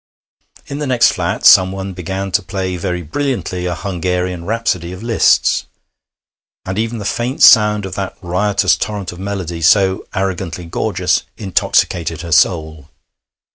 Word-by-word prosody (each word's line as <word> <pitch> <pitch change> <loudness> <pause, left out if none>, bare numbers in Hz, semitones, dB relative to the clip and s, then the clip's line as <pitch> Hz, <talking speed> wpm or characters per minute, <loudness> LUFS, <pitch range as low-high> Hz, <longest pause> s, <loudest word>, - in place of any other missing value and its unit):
In 140 - -6
the 150 - -3
next 125 -2 +4
flat - - -3
someone 95 +1 +5
began 95 +2 -5
to 105 - +2
play 95 -1 -4
very 90 0 -3
brilliantly 95 - -3
a 90 - -2
Hungarian 90 -1 -3
Rhapsody 100 -6 -2
of 90 - -9
Liszt's. 115 -2 +2 1.0
And 95 +2 -3
even 115 +1 -2
the 105 - -6
faint 120 +5 -1
sound 105 -3 +6
of 95 - -6
that 95 -1 -5
riotous 100 +3 +1
torrent 105 -3 -4
of 90 - -11
melody, 95 -4 -4
so 95 +3 +3
arrogantly 95 -3 -3
gorgeous, 85 - 0 0.2
intoxicated 85 -4 0
her 85 -1 -7
soul. 80 -2 +1
95 Hz, 140 wpm, -16 LUFS, 90-105 Hz, 1.0 s, sound